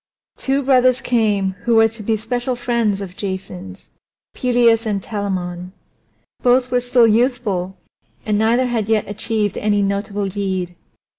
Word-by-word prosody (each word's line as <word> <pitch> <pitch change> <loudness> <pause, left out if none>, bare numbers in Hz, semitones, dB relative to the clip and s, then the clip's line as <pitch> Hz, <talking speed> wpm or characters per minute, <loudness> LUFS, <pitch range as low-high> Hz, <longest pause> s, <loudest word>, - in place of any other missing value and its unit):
Two 275 +1 0
brothers 255 -1 +4
came 210 -6 +1
who 235 -1 +3
were 225 0 +6
to 225 0 -10
be 220 +1 0
special 245 +3 -2
friends 235 -4 0
of 185 -2 -7
Jason's 185 - -6 0.5
Peleus 235 -2 +2
and 205 -2 0
Telamon. 185 -4 -4 0.7
Both 250 0 +3
were 250 - +3
still 245 -1 +3
youthful 215 -5 0 0.5
and 210 - 0
neither 230 +4 +2
had 230 -4 -2
yet 220 -2 +1
achieved 210 0 -2
any 205 -1 +1
notable 200 0 -2
deed. 190 -2 -3
215 Hz, 140 wpm, -19 LUFS, 200-245 Hz, 0.7 s, were